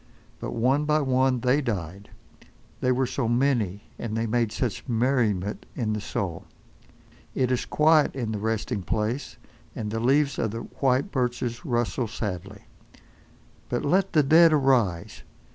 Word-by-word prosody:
But - - -5
one 130 +6 +2
by 150 0 +2
one 130 -2 +2
they 130 +3 +2
died. 100 - -4 0.7
They 125 - +1
were 130 +1 +1
so 125 -1 -2
many, 120 -5 +1 0.2
and 110 -1 -3
they 115 - 0
made 115 -1 0
such 110 -1 -3
merriment 115 -5 0
in 110 -4 -1
the 105 - -3
soul. 85 -5 -4 0.9
It 130 -1 +1
is 125 - 0
quiet 155 -1 +3
in 120 -5 -3
the 105 - -3
resting 110 0 -2
place, 115 +6 -2 0.4
and 105 -3 -4
the 110 - -2
leaves 140 +4 +2
of 110 - 0
the 115 +2 -5
white 135 +9 0
birches 125 +1 -2
rustle 120 -2 -1
sadly. 100 -4 -5 1.1
But - - -2
let 185 +6 +2
the 150 - +5
dead 160 +3 +6
arise! 125 - +1
120 Hz, 150 wpm, -26 LUFS, 110-135 Hz, 1.1 s, dead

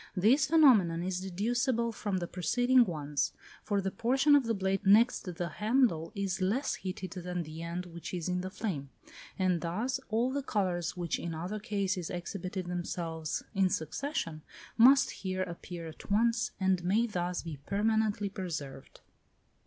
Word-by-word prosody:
This 230 +10 +4
phenomenon 220 - +5
is 185 0 -2
deducible 235 +5 0
from 205 -3 -2
the 175 - -2
preceding 245 +8 +3
ones; 150 -5 -2 0.3
for 205 -2 0
the 195 0 -2
portion 265 +8 +3
of 280 -3 +4
the 230 0 0
blade 195 0 -1
next 210 -1 +4
the 175 +1 -2
handle 215 -7 +2
is 195 -1 -2
less 215 +10 +1
heated 185 -1 -5
than 180 -1 -4
the 155 +1 -8
end 170 +2 -4
which 170 -1 -8
is 175 -2 -3
in 180 0 0
the 185 - -4
flame, 180 -9 -4 0.5
and 185 -3 +1
thus 220 +11 -1
all 230 +4 +1
the 280 +1 -1
colours 185 -9 -1
which 175 -2 -2
in 170 -1 -4
other 180 +7 -4
cases 200 -5 -2
exhibited 185 +1 -4
themselves 170 -2 -3
in 195 -2 +3
succession, 165 - -3 0.3
must 265 +4 +6
here 185 -1 -3
appear 170 -1 -7
at 160 - -11
once, 230 +3 +2
and 190 -2 +2
may 205 +6 +2
thus 180 -5 -2
be 165 -3 -6
permanently 210 0 +1
preserved. 170 -9 -6
190 Hz, 160 wpm, -31 LUFS, 175-225 Hz, 0.5 s, must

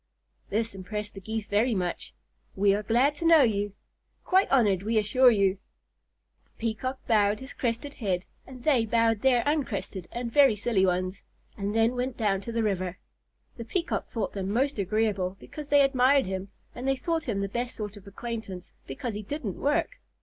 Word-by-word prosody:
This 225 +2 -1
impressed 205 +2 -5
the 195 - -9
Geese 220 +2 -4
very 220 +3 +1
much. 180 -2 -3 0.4
"We 195 0 +4
are 205 - 0
glad 240 +7 +3
to 335 - -4
know 325 -3 +7
you. 205 -3 0 0.5
Quite 380 +1 +3
honored, 210 -9 +3
we 220 +3 0
assure 230 +5 +5
you!" 200 -4 +2 0.9
The - - -37
Peacock 235 +4 -3
bowed 210 -2 +3
his 265 +1 -7
crested 245 +4 -2
head, 190 -7 -2 0.2
and 255 -2 -11
they 255 -7 +3
bowed 225 -1 +2
their 250 -3 +4
uncrested 225 - -2
and 235 -1 -4
very 275 -6 +6
silly 205 -3 +1
ones, 185 +1 -1 0.3
and 200 +1 -3
then 225 0 +4
they 250 +1 0
went 195 -2 +1
to 235 - -4
the 230 0 0
river. 185 -3 -1 0.6
The 230 - -5
Peacock 335 +9 -2
thought 220 -5 -3
them 195 -1 -3
most 260 +4 0
agreeable, 195 -2 0
because 300 -1 -9
they 285 0 +6
admired 270 0 +4
him, 190 +1 -4 0.2
and 250 +2 -5
they 270 - +3
thought 325 +3 -2
him 200 -3 -1
the 200 - -1
best 240 +4 -3
sort 210 -1 -5
of 205 -1 -14
acquaintance, 200 -3 -6 0.2
because 220 - -4
he 210 - -4
didn't 215 - -5
work. 295 - 0
225 Hz, 185 wpm, -27 LUFS, 200-255 Hz, 0.9 s, know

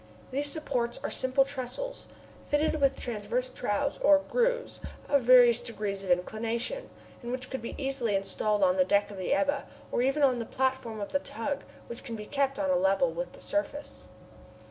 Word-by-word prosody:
These 285 +2 0
supports 250 -7 -2
are - - -2
simple 260 +1 +2
trestles, 280 - -5 0.4
fitted 305 +1 +1
with 275 -1 +3
transverse 240 +2 -2
troughs 255 +2 -1
or 295 -1 +6
grooves - - +1 0.3
of 280 -1 +3
various 240 -1 +7
degrees 210 -5 -4
of 190 - -7
inclination, 230 - -1 0.3
and 240 -1 -5
which 255 0 -5
could 265 - -3
be 230 - -6
easily 270 -6 -1
installed 200 +3 0
on 275 0 +4
the 275 - +6
deck 205 -4 +2
of 200 - -9
the 185 - -2
Ebba, 285 0 +1 0.2
or - - +1
even 270 +4 +2
on 255 -3 +4
the 230 - -3
platform 260 -3 -1
of 200 - -5
the 280 - +2
tug, 275 +3 -4 0.2
which 235 +1 -8
can 235 -4 -5
be 210 -1 -7
kept 275 +2 0
on 285 -1 +1
a - - +4
level 290 - +3
with - - -5
the - - -14
surface. 295 -1 -3
260 Hz, 190 wpm, -29 LUFS, 230-285 Hz, 0.4 s, various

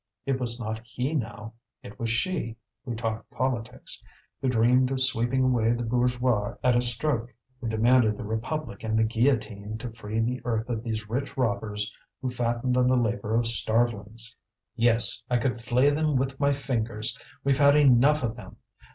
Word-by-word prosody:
It 135 -1 0
was 120 -1 -1
not 110 -1 -4
he 125 +4 -3
now, 110 -5 -4 0.3
it 100 - -11
was 115 - -2
she, 115 0 -1 0.3
who 120 -3 -4
talked 110 -1 -4
politics, 125 -3 -3 0.4
who 130 - +1
dreamed 125 +2 +3
of 135 -1 -2
sweeping 130 0 +2
away 120 -3 +2
the 120 0 -3
bourgeois 125 -2 0
at 125 -1 +4
a 120 - +3
stroke, 120 0 +2 0.3
who 120 - -5
demanded 110 0 +3
the - - -6
republic 110 +2 -4
and 110 0 0
the 110 - +4
guillotine 110 -3 0
to 120 +1 -6
free 110 -1 -4
the 125 +3 -1
earth 115 -2 -1
of 115 -2 -2
these 110 -2 -4
rich 130 +6 -4
robbers 105 -3 -1 0.3
who 130 -2 -3
fattened 120 +1 -1
on 125 0 +3
the 130 0 +3
labour 110 -2 -1
of 120 0 +2
starvelings. 115 0 +1 0.4
"Yes, 115 0 +4
I 125 - +2
could 120 0 -1
flay 125 +4 +3
them 155 0 0
with 135 +1 -1
my 140 0 +3
fingers. 115 -6 -1 0.3
We've 135 -1 +2
had 140 0 +6
enough 140 +1 +5
of 115 -1 -2
them! 120 - -11
120 Hz, 175 wpm, -26 LUFS, 110-130 Hz, 0.4 s, had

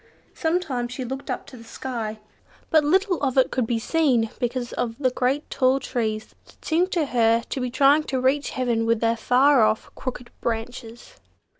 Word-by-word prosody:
Sometimes 315 -8 -1
she 255 0 -5
looked 265 +3 -6
up - - -3
to 260 - -12
the 230 - -12
sky. 230 -2 -5 0.5
But 315 -1 +5
little 370 +4 +2
of 270 -2 0
it 260 - +4
could 250 -3 0
be 235 - 0
seen 245 -4 +1
because 245 0 -2
of 230 -1 -3
the 260 -3 +1
great 260 +4 0
tall 260 0 +2
trees 220 -5 -3
that - - -21
seemed 350 +4 +1
to 330 -4 +1
her 230 -3 +2
to 265 - -3
be 250 - -1
trying 280 +4 +4
to 265 - -1
reach 270 +3 +1
heaven 235 -3 -1
with 230 -1 +2
their 230 0 +2
far 255 +4 +4
off 215 0 +1
crooked 250 -2 -6
branches. 230 0 -5
255 Hz, 185 wpm, -24 LUFS, 230-280 Hz, 0.5 s, But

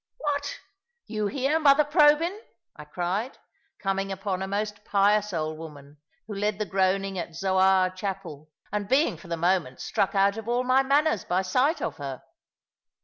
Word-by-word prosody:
"What! 285 -1 -2 0.5
you 215 -2 -2
here, 275 +8 0
mother 295 -1 +5
Probyn?" 300 +3 +4 0.4
I 150 - -11
cried, 180 - -3 0.4
coming 195 0 -2
upon 190 -1 -3
a 190 - -2
most 205 +1 -3
pious 205 +1 +2
old 155 -2 -3
woman, 145 -2 -11 0.3
who 210 - -7
led 205 0 -1
the 210 - -2
groaning 195 0 0
at 170 -1 -6
Zoar 190 0 +3
Chapel, 185 -6 -6 0.2
and 205 0 -3
being 265 - +3
for 170 +3 -14
the 170 0 -3
moment 170 -6 0
struck 195 - -1
out 200 +2 +3
of 225 0 -7
all 240 +1 +1
my 255 +1 +4
manners 280 -3 +2
by 185 +2 0
sight 255 - +1
of - - -3
her. 135 -3 -6
195 Hz, 165 wpm, -26 LUFS, 185-250 Hz, 0.5 s, mother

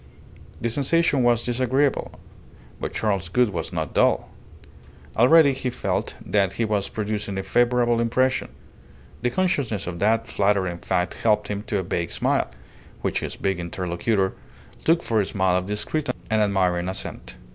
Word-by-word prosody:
The 120 - -1
sensation 145 +2 +2
was 120 -1 +3
disagreeable; 130 +3 0 0.7
but - - -3
Charles 100 -6 -1
Gould 125 +3 +2
was 85 -3 -4
not 80 -4 -3
dull. - - +2 0.9
Already 140 +5 +6
he 130 -1 -3
felt 100 -4 -2
that 100 -3 +1
he 115 - 0
was 105 -2 -1
producing 105 -2 -3
a 95 - -2
favourable 120 +3 +2
impression; 130 +3 +1 0.7
the 125 - +1
consciousness 135 - 0
of 85 -1 -5
that 115 +3 +2
flattering 100 -5 +1
fact 90 0 -1
helped 105 -2 +2
him 100 -1 -2
to 110 -5 0
a 95 - -1
vague 85 -1 -2
smile, - - 0 0.5
which - - 0
his - - -5
big 95 -2 -1
interlocutor 90 +3 -1 0.5
took 165 +1 +3
for 110 -2 +1
a - - -1
smile 95 -2 +1
of 90 0 -3
discreet 120 +9 -2 0.2
and 110 0 +3
admiring 90 -3 +1
assent. 95 - -7
105 Hz, 155 wpm, -24 LUFS, 95-120 Hz, 0.9 s, Already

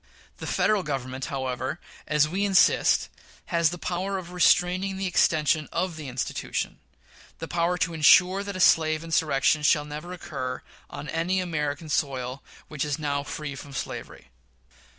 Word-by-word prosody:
The - - -7
Federal 215 -2 +2
Government, 130 -4 -4
however, 130 +2 -3 0.3
as 150 0 +3
we 190 +6 -1
insist, 195 -2 +4 0.5
has 170 -2 +4
the 175 - -5
power 185 +3 -2
of 180 -2 -7
restraining 180 +2 +2
the 195 - -2
extension 155 -3 +2
of 180 0 -1
the 155 -2 -7
institution 125 0 -3 0.6
the 165 - -6
power 170 +2 0
to 170 -1 0
insure 180 +5 +5
that 200 -1 -6
a - - -4
slave 155 -2 +4
insurrection 155 -2 +2
shall 150 0 +3
never 150 +4 -7
occur 130 -7 -5 0.3
on 150 - -7
any 180 +3 0
American 155 -3 -2
soil 135 -3 -2 0.3
which 150 -3 -3
is 150 -1 -1
now 145 -2 -1
free 145 +1 -6
from 140 +1 -10
slavery. 60 - -7
155 Hz, 150 wpm, -26 LUFS, 145-180 Hz, 0.6 s, insure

